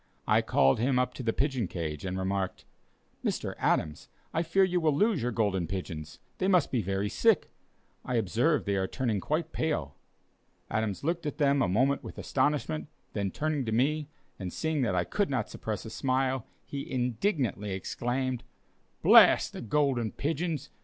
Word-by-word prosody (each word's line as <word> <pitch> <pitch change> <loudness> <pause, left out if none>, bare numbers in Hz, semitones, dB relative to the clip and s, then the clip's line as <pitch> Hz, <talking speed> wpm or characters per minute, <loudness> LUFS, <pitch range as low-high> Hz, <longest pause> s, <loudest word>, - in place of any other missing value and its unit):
I - - +4
called 70 +5 +3
him 125 +2 +2
up 125 0 +1
to - - -7
the 115 -2 +1
pigeon 130 -4 0
cage, 80 -4 -4
and 95 0 -2
remarked: 95 0 -2 0.6
"Mr. - - -1
Adams, 75 -1 0 0.2
I 165 - +1
fear 170 +4 +3
you 180 -1 +2
will 155 -3 +2
lose 210 +1 +2
your 120 +1 0
Golden 100 -6 0
Pigeons; 80 -4 -5 0.2
they 185 - +1
must 180 -6 +3
be 125 - +1
very 95 +1 -1
sick; - - +2 0.5
I 125 - -2
observe 120 - +2
they 100 -1 0
are 95 0 0
turning 115 -4 -1
quite 155 - -2
pale." 80 - -1 0.8
Adams 110 -1 -1
looked 170 +1 -1
at 150 - -4
them 140 -2 +3
a - - +3
moment 130 +8 +2
with - - -9
astonishment, 130 - 0 0.3
then 100 -1 -1
turning 150 +5 -1
to 110 - -2
me, 145 +6 +1 0.3
and 95 -3 -4
seeing 160 - -1
that 105 -7 +1
I - - +2
could 205 -2 -1
not 125 -6 -1
suppress 110 -1 -4
a 110 - -7
smile, 130 -1 0 0.2
he 140 -1 -6
indignantly 125 - 0
exclaimed: 125 +6 -2 0.6
"Blast - - +7
the - - -6
Golden 120 -2 +1
Pigeons! 155 -1 -2
125 Hz, 175 wpm, -29 LUFS, 100-150 Hz, 0.8 s, Blast